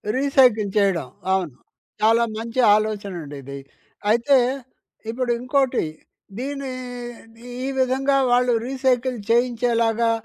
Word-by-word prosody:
Recycle 255 -6 +3
చేయడం. 195 -9 +1 0.3
అవును. 180 -7 -1 0.5
చాలా 225 +2 +4
మంచి 230 +3 -4 0.2
ఆలోచనండి 200 -9 -3
ఇది. 140 +1 -8 0.5
అయితే 235 +5 +4 0.7
ఇప్పుడు 245 +1 -1
ఇంకోటి, 260 - +1 0.5
దీన్ని 275 +1 -4 0.9
ఈ - - -2
విధంగా 265 +2 +2
వాళ్ళు 245 0 +3
రీసైకిల్ 260 -1 0
చేయించేలాగా, 235 -1 +2
235 Hz, 95 wpm, -22 LUFS, 215-260 Hz, 0.9 s, చాలా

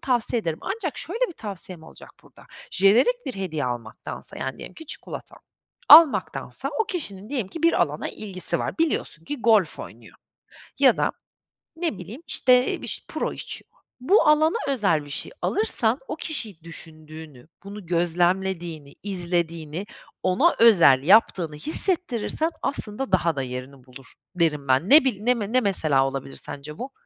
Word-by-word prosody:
tavsiye 240 -2 0
ederim. 165 -5 -3
Ancak 390 -7 -4
şöyle 455 +10 -1
bir - - -8
tavsiyem 190 - -9
olacak - - -13
burada, - - -19 0.2
jenerik 235 - +3
bir 255 - -4
hediye 160 -6 -3
almaktansa, 120 -3 -5
yani, 130 0 -4
diyelim - - -9
ki 320 - -12
çikolata - - -7 0.5
almaktansa, 315 -2 +6
o 445 - +3
kişinin 210 - -5
diyelim 245 -9 -2
ki 330 +7 -8
bir 335 - +4
alana 150 -2 -3
ilgisi 185 -4 -1
var. - - -4
Biliyorsun 295 - -1
ki 290 +4 -5
golf 215 -8 +3
oynuyor - - -11 0.6
ya - - +6
da - - 0 0.6
ne 325 - -2
bileyim, 205 - -9
işte, 250 0 +2
biş - - -5
puro - - -3
içiyor. - - -6 0.3
Bu 390 - +4
alana 310 +6 +4
özel 200 - +1
bir 145 - -13
şey - - -3
alırsan, 435 - +1
o - - -4
kişiyi 220 - -4
düşündüğünü, 155 -4 -9 0.2
bunu 200 -1 -9
gözlemlediğini, 175 -2 0
izlediğini, 175 -2 -2 0.4
ona 275 - +3
özel 170 - +6
yaptığını 175 -3 +3
hissettirirsen 315 - 0
aslında 225 -3 -2
daha 170 -4 +2
da 135 - -2
yerini 130 +1 -7
bulur 130 +1 -14 0.2
derim 150 -5 0
ben. 130 +8 +2
Ne 295 0 +8
bil 210 -6 0
ne 245 +3 +3
me 215 -4 -4
ne 255 +1 +3
mesela 155 - +2
olabilir 135 0 -6
sence 150 +2 -7
bu? 260 +2 -6
190 Hz, 155 wpm, -24 LUFS, 155-255 Hz, 0.6 s, Ne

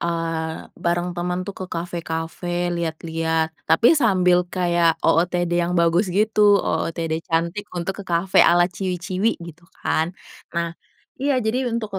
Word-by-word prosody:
eee, 165 -1 -2 0.2
bareng 175 +1 0
teman 180 +1 -2
tuh 200 - -5
ke 185 - -4
kafe-kafe 170 +1 -3
lihat-lihat, 160 -1 -1 0.2
tapi 190 +9 +4
sambil 180 -7 +3
kayak 175 -2 +2
OOTD 175 +1 +2
yang 175 +1 0
bagus 170 +4 +3
gitu, 210 +1 +4
OOTD 165 -1 -2
cantik 170 +5 -1
untuk 180 +3 -3
ke - - -8
kafe 175 +2 +1
ala 175 0 +6
ciwi-ciwi, 185 +2 -2
gitu 170 0 -11 0.2
kan. 165 +3 0 0.4
Nah, 170 0 -1 0.5
iya, 280 0 +1
jadi 245 +4 0
untuk 230 -2 -3
175 Hz, 135 wpm, -22 LUFS, 165-185 Hz, 0.5 s, ala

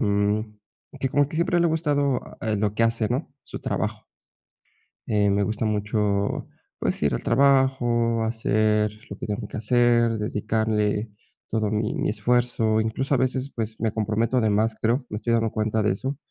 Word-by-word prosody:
mm, 105 +1 0 0.4
que 135 - 0
como 145 +1 +2
que - - -9
siempre 170 +1 +2
le 170 - +3
ha - - +2
gustado 145 -5 +1 0.4
lo 105 0 0
que 115 - +1
hace, 115 -1 +1
¿no?, 135 +3 -3
su - - -7
trabajo. - - -3 1.0
Eh, 105 -2 +2
me 100 +1 +2
gusta 110 +2 -2
mucho, 105 -1 0 0.3
pues, - - -1
ir - - +2
al - - -2
trabajo, 120 -3 +2
hacer 110 -1 +1 0.2
lo 100 - -6
que - - -5
tengo 105 -1 -3
que - - -7
hacer, 120 0 +3
dedicarle 105 0 0 0.4
todo 110 -2 0
mi 110 0 -1
mi - - -1
esfuerzo, 110 0 +1
incluso 130 +6 -1
a - - +4
veces, 130 +2 -1
pues, 110 -1 -4
me 110 -1 0
comprometo 110 +3 0
de 110 - +2
más, 110 +2 +2
creo, 120 +4 +1
me 105 - -4
estoy 115 +2 -1
dando 115 -1 +1
cuenta 110 0 0
de 105 - +2
eso. 130 +8 -3
110 Hz, 175 wpm, -24 LUFS, 105-125 Hz, 1.0 s, a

